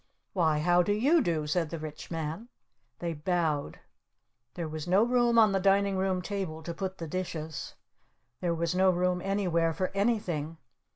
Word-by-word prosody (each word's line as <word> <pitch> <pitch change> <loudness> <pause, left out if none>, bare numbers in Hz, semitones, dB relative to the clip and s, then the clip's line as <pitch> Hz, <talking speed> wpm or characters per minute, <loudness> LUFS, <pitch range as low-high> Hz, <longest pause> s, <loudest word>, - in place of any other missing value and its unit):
"Why, 160 -5 +2
how 175 +3 +4
do 205 +4 +1
you 285 +10 +4
do?" 165 - 0
said 160 +1 0
the 165 - -4
Rich 155 -1 -8
Man. 165 +7 -4 0.5
They 170 -1 -3
bowed. 155 -2 -1 0.7
There 170 -2 -3
was 155 +1 -6
no 190 +4 +4
room 240 -1 +3
on 220 -2 +6
the 195 - +1
Dining 195 +1 +3
Room 185 -1 0
table 180 -6 -4
to 170 - -4
put 190 +2 -4
the 165 - -6
dishes. 160 -3 -5 0.6
There 175 -2 0
was 170 +1 -1
no 190 +1 +4
room 180 0 +1
anywhere 175 -4 +1
for 185 +2 -1
anything. 185 -7 -1
180 Hz, 170 wpm, -29 LUFS, 160-195 Hz, 0.7 s, on